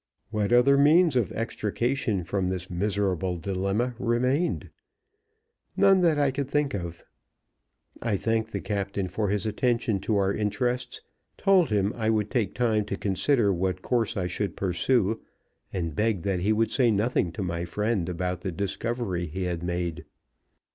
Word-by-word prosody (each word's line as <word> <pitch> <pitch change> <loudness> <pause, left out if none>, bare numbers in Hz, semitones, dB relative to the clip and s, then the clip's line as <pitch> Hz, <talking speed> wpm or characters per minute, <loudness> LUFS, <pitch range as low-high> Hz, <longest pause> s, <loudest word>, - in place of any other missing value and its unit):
What 105 -1 0
other 130 +3 +5
means 155 +1 +5
of 120 -6 +1
extrication 115 -1 -1
from 95 +2 -1
this 90 +1 -4
miserable 95 -1 0
dilemma 100 +7 -1
remained? 125 +8 0 1.1
None 195 -1 +5
that 165 -4 +3
I 145 -2 +3
could 135 0 -3
think 145 -1 +1
of. 85 -3 -5 1.0
I 110 -4 0
thanked 110 +1 -1
the 100 - -3
captain 100 -1 -2
for 100 +3 -2
his 100 0 0
attention 115 -1 0
to 105 +2 0
our 100 0 +2
interests, 125 +4 -1 0.4
told 190 -5 +4
him 105 -1 +1
I 110 -2 0
would 105 -2 0
take 120 -6 0
time 115 -4 +2
to 100 -1 -4
consider 105 +2 +2
what 95 0 -2
course 120 -5 0
I 95 - 0
should 90 +1 -3
pursue, 100 +4 +1 0.5
and 85 -4 -3
begged 105 +1 0
that 100 -2 0
he 100 +5 +1
would 110 +1 +1
say 125 -3 +3
nothing 105 -4 +1
to 100 - -4
my 85 -1 -2
friend 105 0 -1
about 90 0 -3
the 95 - -3
discovery 100 0 -2
he 95 +5 -4
had 90 -2 -2
made. 85 -1 -3
105 Hz, 160 wpm, -27 LUFS, 95-120 Hz, 1.1 s, other